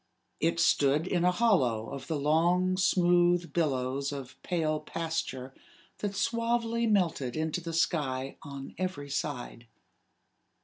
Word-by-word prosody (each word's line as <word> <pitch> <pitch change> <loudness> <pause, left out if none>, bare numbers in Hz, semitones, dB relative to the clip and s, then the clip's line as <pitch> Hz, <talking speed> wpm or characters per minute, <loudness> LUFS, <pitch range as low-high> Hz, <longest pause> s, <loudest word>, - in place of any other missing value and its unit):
It 170 +1 +1
stood 145 0 +3
in 180 -2 0
a 180 - +4
hollow 135 - +2
of 140 - -7
the 160 -3 -1
long 175 +5 +2
smooth 175 -2 +3
billows 140 -3 0
of 135 -3 -8
pale 155 -4 0
pasture 160 -7 -4 0.5
that 205 -1 -3
suavely 230 +1 0
melted 170 - +1
into 160 +2 -1
the 165 0 -5
sky 145 -5 -1
on 140 -1 -8
every 145 -7 -3
side. 125 -5 -4
165 Hz, 125 wpm, -29 LUFS, 140-180 Hz, 0.5 s, a